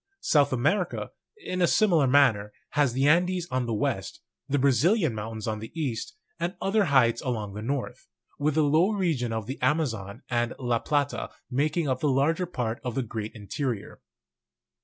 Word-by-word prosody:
South 145 -2 +3
America, 155 - 0 0.3
in 185 - -4
a 175 - +5
similar 170 -11 +3
manner, 125 -7 +4 0.2
has 140 -4 +2
the 135 +3 +2
Andes 175 +2 +2
on 130 -1 0
the 115 - -1
west, 105 - -2 0.3
the 145 - +2
Brazilian 140 - +3
Mountains 110 0 -5
on 110 -1 -2
the 110 - -8
east, 135 +4 -3 0.2
and 170 +2 -2
other 200 +1 +2
heights 125 -6 +3
along 110 -6 -3
the 105 - -6
north, 135 +4 -4 0.3
with 150 0 +1
the 155 - +4
low 160 +8 +3
region 160 - 0
of 110 -1 -3
the 130 +5 -6
Ama 155 +1 +3
zon 110 -2 -6
and 120 0 -1
La 120 -3 0
Plata 145 +1 -1 0.2
making 150 +5 0
up 130 -1 0
the 150 - +1
larger 155 +7 +1
part 120 -8 -3
of 125 -3 -4
the 135 - 0
great 110 -1 -6
1 105 - -10
interior. 120 -1 -4
135 Hz, 180 wpm, -27 LUFS, 115-160 Hz, 0.3 s, a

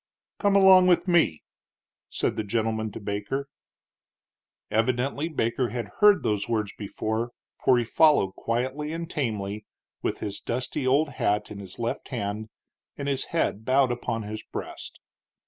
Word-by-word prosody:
"Come 200 -1 +3
along 190 -2 +8
with 175 0 +3
me," 170 - +3 0.7
said - - -1
the 110 - -2
gentleman 110 0 -1
to - - -6
Baker. 105 +7 -3 1.2
Evidently 130 +7 0
Baker 120 -4 0
had 120 -4 -4
heard 205 -2 +6
those 105 -1 0
words 110 -3 -1
before, 110 +3 -3 0.3
for 125 - +5
he 120 - +2
followed 145 -7 +4
quietly 130 +6 -2
and 165 0 -4
tamely, 105 - -3 0.4
with - - -1
his 100 -1 -4
dusty 130 +2 -2
old 145 +4 +3
hat 105 -6 -1
in 100 - -7
his 95 -2 -8
left 115 0 -3
hand 110 -3 -4 0.5
and 140 - -4
his 135 -2 0
head 135 -10 -1
bowed 130 +1 +3
upon 115 -2 -2
his 105 +1 -5
breast. - - -8
120 Hz, 145 wpm, -26 LUFS, 105-145 Hz, 1.2 s, along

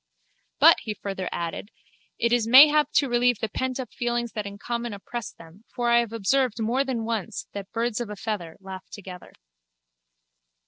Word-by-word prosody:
But, - - +7
he 215 - -5
further 195 -3 -5
added, 170 +4 -4 0.5
it 235 0 +1
is 235 -2 +2
mayhap 295 +4 +7
to 280 - +3
relieve 245 -1 +2
the 220 - -2
pentup 260 +2 -4
feelings 240 -1 -2
that 210 -2 -4
in 200 0 -9
common 235 +2 -4
oppress 230 +3 -6
them 165 +6 -16
for 240 -1 0
I 235 - +6
have 235 -2 -1 0.5
more 235 +4 +1
than 250 -5 -3
once 225 -1 -3
observed - - -35
that 200 -1 -7
birds 235 0 -1
of 235 - -5
a 210 - -6
feather 190 -5 -5
laugh 190 -1 -10
together. 185 -3 -10
230 Hz, 175 wpm, -25 LUFS, 200-240 Hz, 0.5 s, But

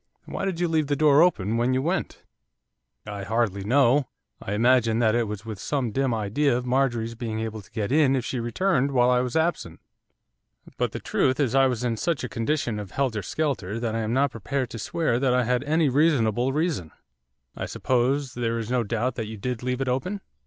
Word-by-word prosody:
'Why - - -4
did 185 -3 -2
you 175 - +1
leave 160 -3 +1
the 145 - +1
door 150 0 +5
open 115 - +2
when 125 +2 +1
you 130 - +1
went?' 175 +1 -2 0.8
'I 100 -2 -6
hardly 105 -2 0
know, 135 +4 +3 0.3
I 100 - -4
imagine 115 0 +3
that 110 -2 +3
it 120 -1 +1
was 105 0 -6
with 110 -4 -6
some 130 -3 -2
dim 135 +2 0
idea 115 +5 +1
of 125 - -4
Marjorie's 125 -3 0
being 115 -2 -4
able 110 -1 -4
to 105 - -20
get 110 0 -3
in 140 -2 +4
if 125 -3 -2
she 125 - -3
returned 140 +3 0
while 125 -1 +4
I 125 - +3
was 125 -1 -2
absent, 160 - -1 1.0
but - - -1
the - - -5
truth 130 +2 0
is 130 -5 +1
I 135 0 +5
was 125 -2 -2
in 115 -2 -1
such 170 -1 -1
a 125 - -3
condition 115 -2 -1
of 100 -2 -7
helter 120 -1 -1
skelter 115 - -2
that 115 -2 -2
I - - 0
am 110 0 -2
not 135 +2 +2
prepared 130 +3 -3
to 115 - -6
swear 155 -2 0
that 130 -2 +2
I 125 - +3
had 125 +2 0
any 155 +1 +2
reasonable 130 -4 +2
reason.' 150 - -1 0.7
'I - - -4
suppose 130 +1 0
there 115 -1 -1
is 115 +1 -4
no 125 -1 +2
doubt 120 +4 -1
that 110 -3 -3
you 110 0 -7
did 125 +3 -4
leave 125 +1 -2
it 135 - -1
open? 180 +11 -2
125 Hz, 215 wpm, -25 LUFS, 115-140 Hz, 1.0 s, door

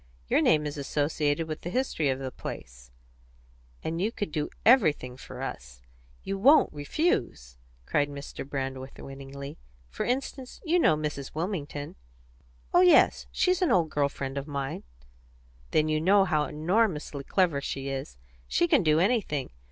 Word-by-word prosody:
Your - - +3
name 150 -1 +3
is 145 0 -4
associated 145 +2 0
with 155 -1 -5
the 175 - -5
history 180 - 0
of 130 - 0
the 130 -1 -5
place, - - -9 0.9
and 165 +2 -2
you 215 +4 +1
could 205 -7 -4
do 150 -1 -2 0.2
everything 155 - +4
for 130 - -9
us. 60 0 -7 0.4
You 195 0 -3
won't 285 +9 +6
refuse!" 140 - -1 0.3
cried 145 0 +1
Mr. 140 0 -7
Brandreth 135 -1 -5
winningly. 135 +1 -9 0.3
"For 65 - -3
instance, 260 +1 -3
you 345 +2 +3
know 155 - +4
Mrs. 150 -3 -4
Wilmington." 155 - -4 0.8
"Oh 355 - +6
yes; 360 -1 +5
she's 365 -1 +2
an 360 - +3
old 165 -6 +3
girl 145 -1 +1
friend 135 0 -4
of 140 - -8
mine." 140 -2 -3 0.9
"Then 155 0 +2
you 155 0 +1
know 195 +3 +5
how 155 -4 +1
enormously 155 -2 0
clever 170 -2 +1
she 135 0 -4
is. 135 - -5 0.3
She 345 - +2
can 295 -7 +4
do 155 -2 +3
anything. 185 - 0
150 Hz, 155 wpm, -28 LUFS, 140-195 Hz, 0.9 s, won't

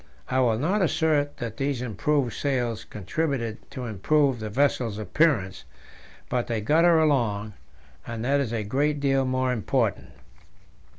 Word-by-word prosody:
I 130 - +1
will 120 -4 +3
not 185 - +1
assert 155 -4 +1
that 115 -2 -5
these 135 -2 -1
improvised 125 +2 -1
sails 120 -5 -1
contributed 115 - -3
to 125 - -6
improve 130 - +1
the 110 -1 -4
vessel's 120 -3 +1
appearance, 110 - +1 0.6
but 125 -1 -1
they 115 -2 -1
got 155 +11 +3
her 170 -1 +6
along, 115 -9 +1 0.5
and 115 -1 -4
that 140 +2 +2
is 130 -5 -1
a 115 -2 -2
great 145 +7 0
deal 135 -1 +2
more 130 0 0
important. 110 -5 -1
130 Hz, 145 wpm, -25 LUFS, 110-145 Hz, 0.6 s, her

